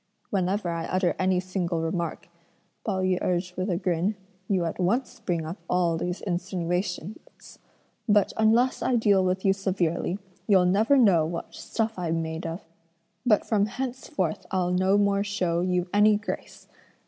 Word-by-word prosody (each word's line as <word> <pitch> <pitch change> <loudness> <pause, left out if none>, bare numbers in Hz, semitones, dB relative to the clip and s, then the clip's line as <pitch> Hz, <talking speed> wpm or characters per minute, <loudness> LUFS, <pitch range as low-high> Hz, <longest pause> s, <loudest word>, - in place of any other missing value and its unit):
"Whenever 190 -1 0
I 165 -1 -3
utter 185 -1 +1
any 185 -1 +2
single 180 -2 -2
remark," 165 0 -3 0.6
Pao 190 -4 -1
yü 185 -1 +1
urged 180 0 -1
with 185 +2 -2
a 175 - +1
grin, 180 +2 0 0.3
"you 185 -4 +1
at 165 - -4
once 235 +9 0
bring 170 -3 -2
up 165 +5 -5
all 175 -2 +2
these 180 +2 -3
insinuations; 180 +1 -4 0.5
but 205 -1 +4
unless 225 +4 +3
I 255 - +1
deal 205 -4 +4
with 185 +1 -1
you 195 - +5
severely, 185 -2 -1 0.3
you'll 190 -4 +5
never 215 +9 +4
know 195 -10 +5
what 170 0 -6
stuff 225 -3 -3
I'm 165 -2 -1
made 160 +1 -4
of; 165 +2 -6 0.6
but 210 -3 +4
from 210 -2 +2
henceforth 240 -8 -3
I'll 180 -2 0
no 185 +2 +3
more 200 -1 +2
show 180 -4 0
you 180 0 0
any 210 +1 +5
grace!" 215 - -7
185 Hz, 160 wpm, -26 LUFS, 175-205 Hz, 0.6 s, you